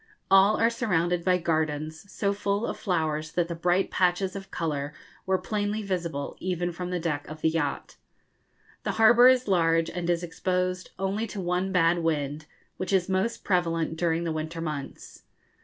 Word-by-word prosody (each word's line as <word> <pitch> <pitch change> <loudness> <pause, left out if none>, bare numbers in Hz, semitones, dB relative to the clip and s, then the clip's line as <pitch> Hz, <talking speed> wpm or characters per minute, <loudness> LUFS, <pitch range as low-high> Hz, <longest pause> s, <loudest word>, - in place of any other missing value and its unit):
All 195 +2 +6
are 230 +1 +3
surrounded 180 -7 0
by 180 0 +3
gardens, 160 +1 -2
so 200 -1 0
full 200 +2 -1
of - - -3
flowers 155 -4 -1
that 175 -1 +1
the 170 - -4
bright 175 +3 +1
patches 185 +1 +1
of 195 -1 -7
colour 150 -4 -3 0.3
were 190 0 +3
plainly 210 +1 -2
visible 170 -7 -3
even 175 -1 -2
from 180 +1 -5
the 180 -1 -1
deck 155 -3 -2
of 155 +1 -9
the 160 - +3
yacht. 160 -3 -2 0.8
The - - -2
harbour 240 +2 +7
is 255 -1 +4
large, 165 -3 +2
and 175 -1 -3
is 175 0 +1
exposed 180 +1 -2
only 195 +4 -1
to 205 - -7
one 180 +1 -1
bad 175 -1 +3
wind, 150 -2 -2 0.3
which 185 0 -3
is 190 -1 +2
most 190 +5 -1
prevalent 165 -3 0
during 165 0 0
the 165 - -1
winter 155 +1 -4
months. 150 -4 -6
175 Hz, 175 wpm, -27 LUFS, 165-195 Hz, 0.8 s, harbour